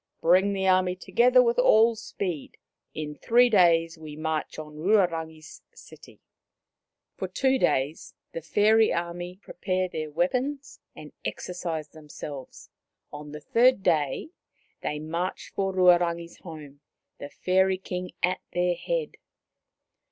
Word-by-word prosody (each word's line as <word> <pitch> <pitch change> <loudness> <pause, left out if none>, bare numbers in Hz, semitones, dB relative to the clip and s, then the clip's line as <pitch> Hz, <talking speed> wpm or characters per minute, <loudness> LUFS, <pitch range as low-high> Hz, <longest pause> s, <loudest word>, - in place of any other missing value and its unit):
Bring 185 +4 +3
the 190 -1 -1
army 185 -1 +3
together 250 +6 +4
with 235 0 +1
all 230 -1 +5
speed. 185 -8 -5 0.4
In 150 -1 -4
three 240 +9 +3
days 165 -4 +3
we 155 -2 -9
march 155 0 -3
on 150 -1 -9
Ruarangi' 165 -4 +1
s - - -13
city." - - -15 1.0
For - - -3
two 265 -1 +1
days 140 - -1 0.2
the 165 - -6
fairy 215 +7 +3
army 175 +1 -4
prepared 185 0 -2
their 155 -1 -4
weapons 255 - -2 0.2
and - - -11
exercised 165 -4 -5
themselves; 150 -3 -10 0.4
on 150 0 -8
the 150 0 -8
third 240 - +3
day 150 - 0 0.5
they 150 - -3
marched 165 +4 -4
for 195 -1 -1
Ruarangi* 175 -2 +3
s - - -17
home, 150 -5 -11 0.4
the 145 - -7
Fairy 190 +2 +1
King 180 -1 -5
at 180 +1 +1
their 180 0 +1
head. - - -3
175 Hz, 130 wpm, -26 LUFS, 155-195 Hz, 1.0 s, all